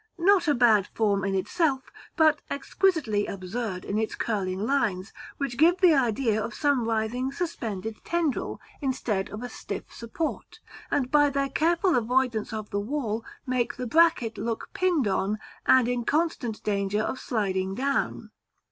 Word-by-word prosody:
not 365 Hz, 0 st, +4 dB
a 295 Hz, -, +4 dB
bad 220 Hz, -5 st, +4 dB
form 205 Hz, -3 st, 0 dB
in 195 Hz, 0 st, 0 dB
itself, 270 Hz, -, 0 dB, 0.2 s
but 310 Hz, -3 st, +4 dB
exquisitely 280 Hz, -, 0 dB
absurd 195 Hz, 0 st, -4 dB
in 205 Hz, +2 st, -1 dB
its 220 Hz, -, -2 dB
curling 195 Hz, -2 st, -2 dB
lines, 220 Hz, -8 st, 0 dB, 0.2 s
which 275 Hz, -3 st, -3 dB
give 345 Hz, +4 st, +5 dB
the 360 Hz, -4 st, +6 dB
idea 230 Hz, -4 st, +1 dB
of 215 Hz, -, -5 dB
some 285 Hz, -5 st, +1 dB
writhing 230 Hz, +4 st, -1 dB
suspended 225 Hz, -, -4 dB
tendril, 335 Hz, -5 st, -1 dB, 0.2 s
instead 245 Hz, -8 st, -1 dB
of 215 Hz, +3 st, -7 dB
a -, -, -3 dB
stiff -, -, -7 dB
support, 235 Hz, +8 st, -5 dB, 0.3 s
and 255 Hz, -3 st, 0 dB
by 290 Hz, -1 st, +5 dB
their 275 Hz, 0 st, -1 dB
careful 340 Hz, +5 st, +2 dB
avoidance 245 Hz, -1 st, +1 dB
of 215 Hz, -1 st, -5 dB
the 200 Hz, -, 0 dB
wall 225 Hz, -1 st, -2 dB, 0.2 s
make 255 Hz, -2 st, 0 dB
the 250 Hz, -, -4 dB
bracket 245 Hz, -4 st, +3 dB
look 225 Hz, +1 st, -3 dB
pinned 350 Hz, -, +1 dB
on, 200 Hz, +2 st, 0 dB, 0.3 s
and 260 Hz, -2 st, +6 dB
in 245 Hz, -1 st, -1 dB
constant 280 Hz, -6 st, -1 dB
danger 200 Hz, 0 st, 0 dB
of 255 Hz, -, -3 dB
sliding 190 Hz, -4 st, -1 dB
down. 275 Hz, +4 st, -1 dB
240 Hz, 155 wpm, -27 LUFS, 210-285 Hz, 0.3 s, the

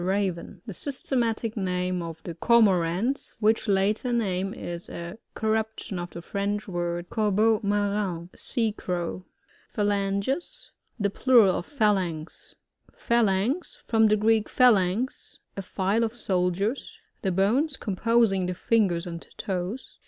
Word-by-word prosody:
Raven, 190 Hz, -2 st, -2 dB
The 215 Hz, -, -6 dB
systematic 235 Hz, -, -2 dB
name 180 Hz, -2 st, -1 dB
of 165 Hz, -1 st, -7 dB
the 170 Hz, -, -5 dB
Cor* 235 Hz, +8 st, +4 dB
morants, 190 Hz, +7 st, 0 dB
which 220 Hz, +1 st, +2 dB
latter 205 Hz, +5 st, +1 dB
name 195 Hz, -5 st, 0 dB
is 175 Hz, -3 st, -6 dB
a 170 Hz, +5 st, -7 dB, 0.2 s
corruption 220 Hz, -3 st, -2 dB
of 175 Hz, 0 st, -5 dB
the 170 Hz, -, -9 dB
French 205 Hz, +2 st, -2 dB
words, 175 Hz, -1 st, -3 dB
cor 215 Hz, -2 st, +1 dB
beau 215 Hz, +2 st, +3 dB
marine 200 Hz, -4 st, -1 dB
Sea 225 Hz, -3 st, 0 dB
crow. 180 Hz, -2 st, -4 dB, 0.4 s
Phalanges. 205 Hz, -, -1 dB
— -, -, -38 dB
The 200 Hz, -1 st, +1 dB
plural 230 Hz, -6 st, +5 dB
of -, -, -9 dB
Phalanx. 190 Hz, -, -1 dB, 0.4 s
Phalanx. 235 Hz, -, +1 dB
— -, -, -42 dB
^From 220 Hz, -1 st, +4 dB
the 215 Hz, -, +4 dB
Gteek^phalagx, 220 Hz, 0 st, +2 dB, 0.2 s
a 195 Hz, -, -3 dB
file 195 Hz, +4 st, 0 dB
of 225 Hz, +1 st, -2 dB
soldiers. 195 Hz, +2 st, -1 dB, 0.2 s
The 190 Hz, -, 0 dB
bones 245 Hz, -, +2 dB
com 200 Hz, -, -4 dB
posing 225 Hz, -4 st, +2 dB
the 180 Hz, -, -3 dB
fingers 185 Hz, -4 st, +1 dB
and 170 Hz, -1 st, -7 dB
toes. 190 Hz, +6 st, -4 dB
200 Hz, 140 wpm, -26 LUFS, 180-225 Hz, 0.4 s, plural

